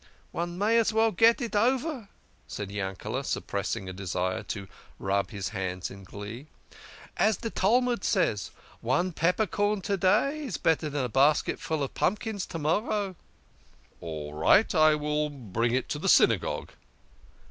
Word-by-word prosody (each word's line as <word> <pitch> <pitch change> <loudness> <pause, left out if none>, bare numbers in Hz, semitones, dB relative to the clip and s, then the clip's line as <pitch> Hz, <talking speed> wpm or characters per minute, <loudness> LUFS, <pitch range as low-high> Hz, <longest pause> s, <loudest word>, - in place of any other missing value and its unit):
" - - -33
One 175 +1 -3
may 220 +4 +3
as 230 - +2
veil 225 0 +3
get 225 +6 +4
it 235 -3 -3
over," 255 +1 +1 0.4
said 105 -2 -6
Yankele, 95 -2 -3
suppressing 95 - -3
a 95 - -5
desire 95 -1 -2
to 100 -2 -6 0.3
rub 100 +1 0
his 100 -3 -4
hands 95 -4 -4
in 100 0 -11
glee. 105 +9 -8 0.4
" - - -15 0.3
As 215 -3 +3
de 225 - -5
Talmud 240 +2 +2
says, 100 -4 +1 0.2
' - - -25
One 180 +7 +2
peppercorn 205 +4 +1
to 200 +1 -1
day 275 - +2
is 270 - -4
better 160 -1 +1
dan 145 -2 -2
a - - -3
basketful 145 +3 +2
of 135 - -4
pump 205 +3 0
kins 215 -4 -4
to - - -5
morrow.' 195 +5 0 0.3
" - - -33
" - - -33
All 75 -3 -6
right! 190 - +4
I 155 -2 +5
will 150 0 -1
bring 120 -3 -1
it 130 - -1
to - - -2
the - - 0
Synagogue." - - +3
155 Hz, 170 wpm, -28 LUFS, -, 0.4 s, I